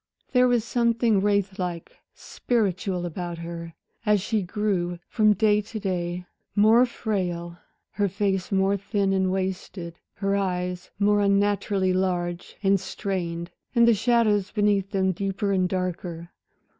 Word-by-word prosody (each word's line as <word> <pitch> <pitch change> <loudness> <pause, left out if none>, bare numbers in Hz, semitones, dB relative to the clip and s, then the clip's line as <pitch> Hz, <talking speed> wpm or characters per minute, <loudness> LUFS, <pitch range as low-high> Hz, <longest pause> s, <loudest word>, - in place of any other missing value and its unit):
There 250 0 +5
was 240 -3 +2
something 230 -3 +2
wraith 200 -1 0
like, 175 -2 -4 0.2
spiritual 195 -5 -1
about 175 0 -5
her, 170 0 -7 0.3
as 210 -1 +3
she 215 +2 -1
grew 180 -2 -1
from 215 -2 +4
day 210 0 +3
to 215 +2 -7
day, 180 -2 -3 0.3
more 220 +4 +6
frail, 175 -7 -3 0.3
her 205 -1 0
face 195 0 -1
more 195 +1 +2
thin 200 0 0
and 190 -1 +1
wasted, 185 -2 -4 0.2
her 195 0 0
eyes 180 -2 -2
more 205 0 +3
unnaturally 200 -1 +2
large 175 -2 -2
and 195 0 +4
strained, 175 -3 -4 0.2
and 235 0 +6
the 235 - +6
shadows 215 -2 +2
beneath 205 -2 +1
them 190 -2 +1
deeper 195 +2 -2
and 185 -2 +2
darker. 175 -2 -4
195 Hz, 135 wpm, -25 LUFS, 180-210 Hz, 0.3 s, more